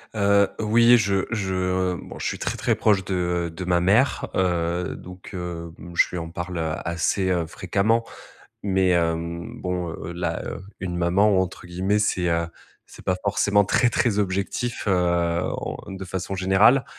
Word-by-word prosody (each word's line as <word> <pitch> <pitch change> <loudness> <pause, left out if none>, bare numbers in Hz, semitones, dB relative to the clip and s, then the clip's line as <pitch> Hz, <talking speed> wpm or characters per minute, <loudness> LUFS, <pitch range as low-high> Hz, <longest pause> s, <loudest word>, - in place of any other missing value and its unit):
Heu, 100 -1 +4
oui, 115 +3 +5
je 100 -4 +1
je, 100 -5 -1
heu 90 0 0
bon, - - -10
je - - -5
suis - - -2
très - - -2
très - - +1
proche 100 -3 +2
de, 95 - -3 0.3
heu, - - -8
de 80 +3 -7
ma 90 -1 +2
mère, 105 +10 +2
heu, 90 -1 0
donc, 90 0 -11
heu, 85 -2 -5
bon, 85 - -10
je - - +4
lui 90 - -5
en 85 -1 -5
parle 90 +1 -5 0.3
assez, 85 +3 0
heu, 90 -2 +1
fréquemment. 100 +7 0 0.6
Mais, 95 -2 +2
hem, 85 0 -1
bon, 90 -2 -2
heu, 80 +1 -6
là, 85 0 -2
heu, - - -5 0.2
une 90 -2 -3
maman, 95 +3 +3
entre 95 0 -5
guillemets, 95 +4 0
c'est, 95 -4 +1
heu, 85 0 +1 0.4
c'est - - -14
pas 95 - +1
forcément 105 0 +3
«très 120 +5 +3
très 110 -2 +1
objectif», 100 +5 -2
heu, - - +3 0.7
on - - -4
heu, 95 - -6
de 95 - -6
façon 95 +1 -4
générale. 95 +8 +4
95 Hz, 180 wpm, -24 LUFS, 85-100 Hz, 0.7 s, oui